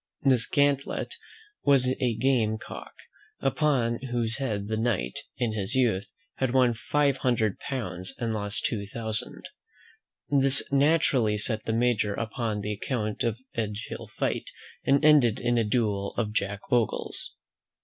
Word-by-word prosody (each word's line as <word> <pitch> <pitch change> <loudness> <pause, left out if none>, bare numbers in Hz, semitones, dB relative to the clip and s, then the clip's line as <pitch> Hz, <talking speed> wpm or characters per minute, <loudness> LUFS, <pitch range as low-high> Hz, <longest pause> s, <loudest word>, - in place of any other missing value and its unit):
This 130 -4 +3
Gantlett 140 -1 +1 0.5
was 135 -3 +4
a 120 -3 +1
game 115 -3 +2
cock, - - -9 0.5
upon 135 -4 +1
whose 120 -3 -2
head 105 -7 -2
the 110 - -1
knight, 110 - -1 0.2
in 120 -3 0
his 110 +3 -3
youth, 110 -7 +2 0.3
had 130 -1 0
won 125 -2 +5
five 140 +3 +1
hundred 115 -6 +1
pounds, 100 -9 -4
and 115 -2 -2
lost 100 -1 -2
two 100 -3 -1
thousand. 110 0 -4 0.8
This 135 -1 +4
naturally 140 -6 +3
set 110 +1 0
the 110 - -1
Major 115 -3 +1
upon 115 -2 -2
the 105 +1 -2
account 105 0 -3
of 115 -1 0 0.2
Edge 105 -1 -3
hill - - -7
fight, - - -2 0.3
and 140 +2 +3
ended 140 -8 +5
in 120 0 +1
a - - +3
duel 105 -3 0
of 105 -3 -1
Jack 100 -1 -1
Ogle's. 120 -3 0
115 Hz, 145 wpm, -27 LUFS, 105-130 Hz, 0.8 s, won